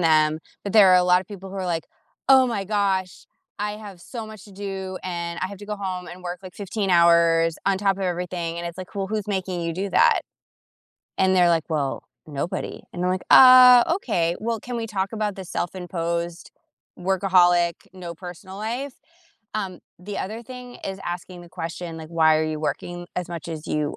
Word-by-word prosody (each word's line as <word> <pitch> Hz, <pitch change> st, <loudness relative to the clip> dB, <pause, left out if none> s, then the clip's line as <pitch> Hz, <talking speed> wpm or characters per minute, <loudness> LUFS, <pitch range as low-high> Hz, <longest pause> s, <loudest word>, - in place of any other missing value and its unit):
them, 155 Hz, -2 st, +3 dB, 0.3 s
but 200 Hz, -, -3 dB
there 210 Hz, -3 st, +8 dB
are 185 Hz, -, +7 dB
a 180 Hz, -, +4 dB
lot 180 Hz, 0 st, +5 dB
of 185 Hz, -, -11 dB
people 195 Hz, -2 st, -9 dB
who 195 Hz, -, -7 dB
are 190 Hz, -1 st, -3 dB
like, 165 Hz, -2 st, -1 dB, 0.4 s
"Oh, 265 Hz, -1 st, +7 dB
my 205 Hz, -5 st, -2 dB
gosh. 195 Hz, -3 st, -1 dB, 0.4 s
I 210 Hz, 0 st, -1 dB
have 205 Hz, -4 st, -10 dB
so 230 Hz, +5 st, -7 dB
much 215 Hz, -3 st, -11 dB
to 205 Hz, -, -15 dB
do, 190 Hz, -1 st, -5 dB
and 170 Hz, -1 st, -4 dB
I 185 Hz, -, 0 dB
have 200 Hz, -1 st, -9 dB
to 205 Hz, -, -10 dB
go 210 Hz, -, -3 dB
home 185 Hz, -2 st, -4 dB
and 180 Hz, +1 st, -10 dB
work, 175 Hz, 0 st, -5 dB
like, 185 Hz, -, -10 dB
15 200 Hz, 0 st, -3 dB
hours 170 Hz, -1 st, +4 dB
on 195 Hz, -1 st, +3 dB
top 195 Hz, -1 st, +2 dB
of 195 Hz, -, -5 dB
everything." 175 Hz, -1 st, -3 dB
And 170 Hz, -, -4 dB
it's 170 Hz, +2 st, -7 dB
like, 185 Hz, -, -8 dB
"Well, 195 Hz, -1 st, -2 dB
who's 215 Hz, -2 st, -2 dB
making 185 Hz, -3 st, -2 dB
you 165 Hz, 0 st, -2 dB
do 195 Hz, +4 st, -3 dB
that?" -, -, +4 dB, 1.0 s
And 190 Hz, 0 st, +3 dB
they're 180 Hz, -1 st, +5 dB
like, 165 Hz, -2 st, +2 dB
"Well, 145 Hz, -4 st, -1 dB, 0.2 s
nobody," 145 Hz, +3 st, -4 dB
and 175 Hz, 0 st, -3 dB
I'm 180 Hz, -, +2 dB
like, 185 Hz, 0 st, -1 dB
"Ah, 255 Hz, -1 st, +10 dB
okay. 175 Hz, -, 0 dB
Well, 225 Hz, 0 st, -2 dB
can 245 Hz, -1 st, -5 dB
we 230 Hz, -1 st, -3 dB
talk 195 Hz, -2 st, -2 dB
about 210 Hz, -2 st, -2 dB
the 190 Hz, -, -7 dB
self-imposed 170 Hz, -1 st, -3 dB, 0.5 s
workaholic, 180 Hz, -2 st, +3 dB, 0.2 s
no 175 Hz, -2 st, -7 dB
personal 180 Hz, +2 st, -10 dB
life?" 245 Hz, +6 st, -4 dB, 0.6 s
Um, 190 Hz, -4 st, -4 dB, 0.2 s
the 200 Hz, +3 st, -6 dB
other 220 Hz, +5 st, -5 dB
thing 250 Hz, 0 st, -10 dB
is 195 Hz, 0 st, -4 dB
asking 175 Hz, 0 st, -6 dB
the 175 Hz, -, -13 dB
question, 165 Hz, 0 st, -6 dB
like, 160 Hz, -1 st, -9 dB
"Why 160 Hz, -1 st, +4 dB
are 155 Hz, -, +1 dB
you 155 Hz, -1 st, -3 dB
working 175 Hz, +3 st, -4 dB
as 180 Hz, -1 st, -3 dB
much 170 Hz, -3 st, -6 dB
as 160 Hz, -2 st, -6 dB
you 150 Hz, -1 st, -1 dB
185 Hz, 205 wpm, -24 LUFS, 170-200 Hz, 1.0 s, Ah